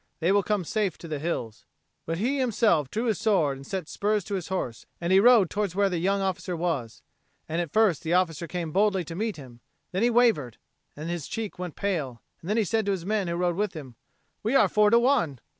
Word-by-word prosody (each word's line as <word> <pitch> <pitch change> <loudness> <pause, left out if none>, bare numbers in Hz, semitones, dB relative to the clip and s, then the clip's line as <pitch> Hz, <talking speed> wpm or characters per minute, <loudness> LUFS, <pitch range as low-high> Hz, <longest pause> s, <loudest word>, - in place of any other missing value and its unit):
They 170 +2 +2
will 200 0 +4
come 205 -1 -1
safe 200 -1 -1
to 170 - -10
the 155 -2 -4
hills." 130 -9 -4 0.4
But 165 +1 -2
he 260 +9 0
himself 220 - +2
drew 225 - -2
his 220 -5 0
sword 180 -11 +2
and 135 - -12
set 190 -5 -4
spurs 210 +2 0
to 205 - -6
his 185 -4 -3
horse, 155 -12 -4
and 170 +2 0
he 190 - +7
rode 225 -4 +6
towards 205 -4 -2
where 200 0 +3
the 175 - -1
young 195 +3 +1
officer 185 -1 -2
was. 160 -10 -3 0.4
And 165 +2 -1
at 170 -4 -5
first 215 -8 +3
the 165 +1 -1
officer 170 -3 0
came 170 -3 -4
boldly 195 0 +2
to 165 +1 -8
meet 215 +1 -2
him; 125 -5 -12 0.3
then 185 - -1
he 240 - +4
wavered, 225 - +2 0.4
and 150 +2 -6
his 170 -5 -4
cheek 220 -5 -5
went 180 -3 -5
pale; 150 -12 -3 0.2
and 205 +7 -1
he 220 - +2
said 220 +1 0
to 195 -1 +1
the 170 - -10
men 210 -2 0
who 170 - -2
rode 175 0 0
with 205 +1 -1
him, 135 -6 -8 0.5
"We 225 +6 0
are - - +6
four 210 0 +4
to 230 - +5
one." 235 - +2
185 Hz, 235 wpm, -26 LUFS, 165-210 Hz, 0.5 s, he